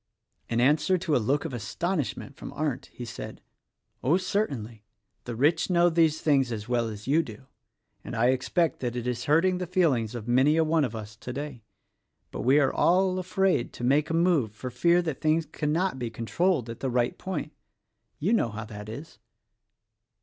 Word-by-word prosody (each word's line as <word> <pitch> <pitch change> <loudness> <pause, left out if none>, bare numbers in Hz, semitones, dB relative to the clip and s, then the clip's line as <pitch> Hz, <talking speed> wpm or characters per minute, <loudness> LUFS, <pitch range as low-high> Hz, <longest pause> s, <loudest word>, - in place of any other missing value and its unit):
'" - - -46
In 115 - 0
answer 150 +8 +3
to 170 -4 0
a - - +3
look 140 +8 0
of 155 - -4
astonishment 140 - -3
from - - -8
Arndt 145 -3 -2
he 120 - -9
said, - - -8 0.6
"Oh, 150 +8 +4
certainly! 135 - -2 0.4
the 120 - -5
rich 155 +9 +2
know 175 -1 +4
these 160 -2 +2
things 135 -5 +2
as 110 -1 -5
well 120 -2 +1
as 105 -1 -7
you 150 +5 +3
do; 135 -4 -10 0.6
and - - -6
I 120 +2 +3
expect 145 +6 +1
that 120 -2 -3
it 120 -1 -3
is 125 0 -2
hurting 180 +5 +3
the 180 - -3
feelings 135 - +1
of 115 -1 -6
many 130 +6 +4
a 165 - +4
one 160 0 +2
of 120 -4 -2
us 110 -1 -7
today; 130 +2 -6 0.7
but - - -5
we 135 +4 +4
are 135 -2 +2
all 185 +1 +3
afraid 185 -6 0
to - - -8
make 140 +5 +2
a 165 - 0
move 165 - +2
for 125 +5 -6
fear 170 +8 +3
that 160 -6 -4
things 155 +1 +2
cannot 155 +1 -1
be 120 -2 -3
controlled 120 - 0
at 115 0 -7
the 135 - -2
right 120 -1 +1
point. 160 -5 -4 0.6
You 190 +10 +1
know 170 - +2
how 110 +1 -6
that 105 -1 -9
is." 140 +8 -9
140 Hz, 195 wpm, -27 LUFS, 120-165 Hz, 0.7 s, Oh